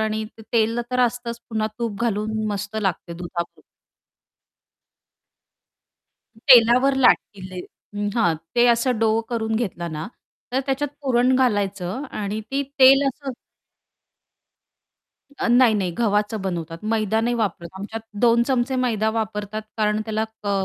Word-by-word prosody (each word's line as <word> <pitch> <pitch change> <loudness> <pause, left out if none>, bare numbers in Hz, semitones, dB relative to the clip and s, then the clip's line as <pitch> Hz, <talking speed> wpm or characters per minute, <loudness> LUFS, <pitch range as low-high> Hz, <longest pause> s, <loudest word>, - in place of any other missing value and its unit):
आणि 220 0 -1
तेल 225 +1 0
अ, - - 0
तर 250 0 +1
असतंच 240 -1 -1
पुन्हा 220 -1 0
तूप 230 -4 -3
घालून 220 -1 -1
मस्त 205 +1 -5
लागते 190 -4 -2
दुधाबरोबर. 170 0 -6 2.7
तेलावर 250 +2 +6
लाटतील. 190 -7 +1 0.6
हां. 175 -8 +3 0.2
ते 240 0 +6
असं 235 0 0
डो 225 0 +3 0.2
करून 225 -2 -2
घेतलं 175 -7 -3
ना, 155 +1 -4 0.5
तर 260 - +2
त्याच्यात 275 +2 0
पुरण 255 -1 +3
घालायचं 205 -3 0 0.2
आणि 205 +2 -3
ती 275 +1 0 0.2
तेल 270 +2 +7
असं 270 0 -5 2.1
अ, - - -1
नाही, 240 -1 +5
नाही. 190 -4 0
गव्हाचं 210 -1 +1
बनवतात. 170 -3 -4
मैदा 220 0 0
नाही 240 +2 0
वापरत 195 -6 -2
आमच्यात 220 +3 -6 0.2
2 235 0 +5
चमचे 260 0 +1
मैदा 225 -4 +1
वापरतात 210 0 -3
कारण 210 -1 +1
त्याला 220 0 -1 0.2
क 200 -1 0
220 Hz, 130 wpm, -22 LUFS, 205-240 Hz, 2.7 s, तेल